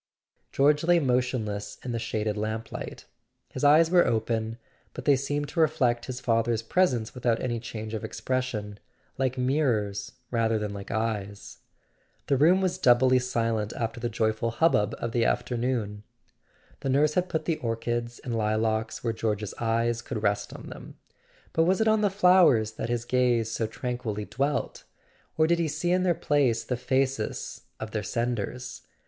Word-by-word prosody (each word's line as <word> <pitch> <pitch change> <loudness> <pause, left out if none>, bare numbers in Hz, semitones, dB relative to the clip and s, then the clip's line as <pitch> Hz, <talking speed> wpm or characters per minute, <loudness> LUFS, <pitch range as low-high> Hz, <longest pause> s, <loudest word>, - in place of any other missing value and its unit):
George 145 +2 +3
lay 175 +1 +4
motionless 125 -7 -1
in 125 - -3
the 115 - -2
shaded 110 -1 -2
lamplight: 110 +1 -5 0.4
his - - -6
eyes 155 +3 +6
were 180 -1 +6
open, 110 0 -1 0.4
but - - -7
they 145 - +6
seemed 145 +2 -2
to - - -4
reflect 135 -7 +2
his 130 -1 -5
father's 115 -1 +1
presence 125 -5 +1
without 120 -3 0
any 120 -2 -2
change 110 -1 -7
of 110 - -4
expression, 115 -6 -3 0.4
like 130 -1 0
mirrors 120 -7 0 0.2
rather 115 -2 +1
than 105 -1 -3
like 100 -1 -8
eyes. 105 -2 -3 0.7
The 140 - +2
room 170 +8 +5
was 185 -1 0
doubly 130 -3 +5
silent 115 -3 -1
after 115 0 -3
the 120 0 -2
joyful 110 0 0
hubbub 115 -5 +2
of 115 - -3
the 120 0 +1
afternoon. 115 -5 -1 0.8
The 135 - -3
nurse 145 +3 +3
had 180 +1 0
put 160 - -2
the 165 -2 0
orchids 120 +1 -3
and 120 -3 -4
lilacs 110 0 0
where 115 -2 0
George's 105 -2 -2
eyes 115 0 0
could 115 -4 -5
rest 100 -1 0
on - - -10
them. - - -11 0.6
But 160 - +3
was 185 +3 +2
it 220 - +2
on 220 0 +4
the 205 - +3
flowers 180 - +5
that 110 - -5
his 120 0 -1
gaze 120 -3 +2
so 115 -1 -1
tranquilly 110 -2 -4
dwelt? 140 +6 -2 0.5
Or 155 - +5
did 170 +1 +2
he 165 - +1
see 160 +4 -1
in 180 +1 +3
their 180 -2 +2
place 140 -7 +1
the 125 - -2
faces 130 +2 -1 0.2
of 110 0 -6
their 110 - -2
senders 120 +2 -3
120 Hz, 165 wpm, -27 LUFS, 110-140 Hz, 0.8 s, eyes